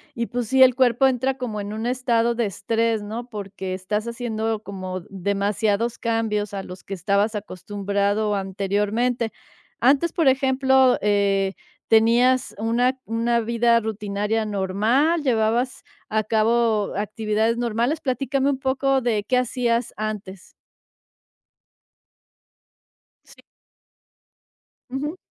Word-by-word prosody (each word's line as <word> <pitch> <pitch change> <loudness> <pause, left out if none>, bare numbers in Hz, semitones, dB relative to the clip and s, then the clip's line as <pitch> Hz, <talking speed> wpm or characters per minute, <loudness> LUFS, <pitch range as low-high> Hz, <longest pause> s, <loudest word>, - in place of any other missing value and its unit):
y 235 -1 -1
pues 245 -1 -3
sí, 265 +3 +6
el 255 -1 +6
cuerpo 255 0 +3
entra 265 +1 +1
como 220 -5 -4
en 205 +1 -6
un 220 +1 -4
estado 240 -2 +1
de 235 -2 0
estrés, 225 +3 -1
¿no?, 230 +4 -6
porque 195 -3 -5
estás 210 +4 -3
haciendo 225 -2 -3
como 185 -2 -6
demasiados 200 +4 -1
cambios 215 -3 -1
a 195 - -4
los 180 0 -10
que 195 - -5
estabas 200 +4 +1
acostumbrado 205 +1 -1
anteriormente, 205 +5 -1 0.5
antes, 280 +7 +3
por 325 -4 +1
ejemplo, 265 -1 +4
eh, 200 -1 +1 0.4
¿tenías 240 +3 +3
una 240 +4 +1
una 235 +1 0
vida 235 +1 +3
rutinaria 210 0 -2
normal? 215 - +1
¿Llevabas 245 0 0 0.3
a 215 0 +1
cabo 220 0 +1
actividades 215 +2 0
normales? 240 +6 0
Platícame 270 +1 0
un 275 - 0
poco 270 0 +1
de, 225 -4 0
¿qué 250 +4 +1
hacías 240 -1 0
antes? 205 -3 -6 2.7
Sí. - - -18 1.5
Ujú. 290 +6 -4
225 Hz, 115 wpm, -23 LUFS, 205-250 Hz, 2.7 s, sí